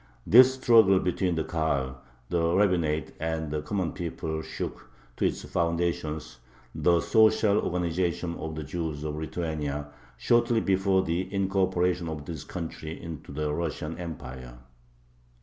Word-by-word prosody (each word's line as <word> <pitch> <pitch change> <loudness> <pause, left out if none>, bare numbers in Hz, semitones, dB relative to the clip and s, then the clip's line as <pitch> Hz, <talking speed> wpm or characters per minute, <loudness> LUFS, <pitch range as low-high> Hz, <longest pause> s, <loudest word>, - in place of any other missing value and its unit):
This 130 +4 +7
struggle 110 -7 +6
between 90 -1 0
the 80 - 0
Kahal, 70 -6 -1 0.3
the 85 0 +1
rabbinate, 85 -7 +1
and 80 -1 -2
the 75 0 -1
common 90 0 -2
people 80 -2 -4
shook - - -6 0.3
to - - +1
its - - -4
foundations 85 -5 -2 0.3
the 85 -1 +3
social 110 -1 +4
organization 85 0 -1
of 80 -1 -5
the 80 - -4
Jews 75 -1 -4
of 75 -1 -3
Lithuania 75 -2 -3 0.3
shortly 120 -1 +3
before 95 -1 +2
the 90 +3 -2
incorporation 95 -3 +1
of 75 -2 -6
this 80 -3 -6
country 80 -2 -6
into 85 -4 -8
the 75 +1 -2
Russian 80 0 -3
Empire. 65 -7 -7
85 Hz, 130 wpm, -27 LUFS, 75-95 Hz, 0.3 s, This